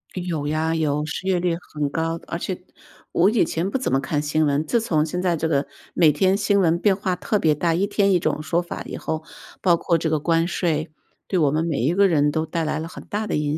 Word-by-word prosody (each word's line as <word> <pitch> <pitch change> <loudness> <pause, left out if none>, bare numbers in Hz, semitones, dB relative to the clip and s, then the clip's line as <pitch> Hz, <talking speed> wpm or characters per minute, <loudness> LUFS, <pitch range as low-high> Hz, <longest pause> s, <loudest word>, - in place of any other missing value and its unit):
有 175 -5 -3
呀， 155 +2 0
有， 150 -2 0
失 160 +4 -5
业 185 -2 +2
率 170 -1 0 0.2
很 150 -2 -1
高。 165 +2 -2
而 170 - -3
且 180 +1 -4 0.5
我 180 +4 +4
以 220 -6 +3
前 170 +3 -2
不 265 - -1
怎 260 - -2
么 135 - +4
看 145 +2 -1
新 155 +1 +1
闻， 145 +2 +1
自 230 +8 +1
从 155 -8 +1
现 180 +3 -3
在 175 -2 +1
这 160 - -1
个 145 -3 0 0.3
每 160 -3 +5
天 185 +6 +2
新 200 0 +2
闻 170 -2 +3
变 200 +2 +3
化 190 -2 -1
特 205 +4 -1
别 155 -4 +3
大， 165 +2 +1
一 190 +5 +1
天 200 -1 +2
一 180 - +4
种 155 -2 -1
说 170 +2 +1
法 175 - -6
以 - - -6
后， 155 0 -3 0.4
包 175 -3 +4
括 170 - +1
这 160 0 -1
个 155 - +1
关 165 +2 +2
税， 160 -3 -1 0.4
对 185 - 0
我 150 -4 +4
们 155 +2 +1
每 160 -4 -1
一 135 +8 +1
个 200 +2 +5
人 150 -3 +3
都 160 +2 -1
带 165 -1 -2
来 155 0 -1
了 160 - -4
很 - - -10
大 210 +1 -3
的 205 - -1
影 150 0 -1
165 Hz, 280 characters per minute, -23 LUFS, 155-180 Hz, 0.5 s, 每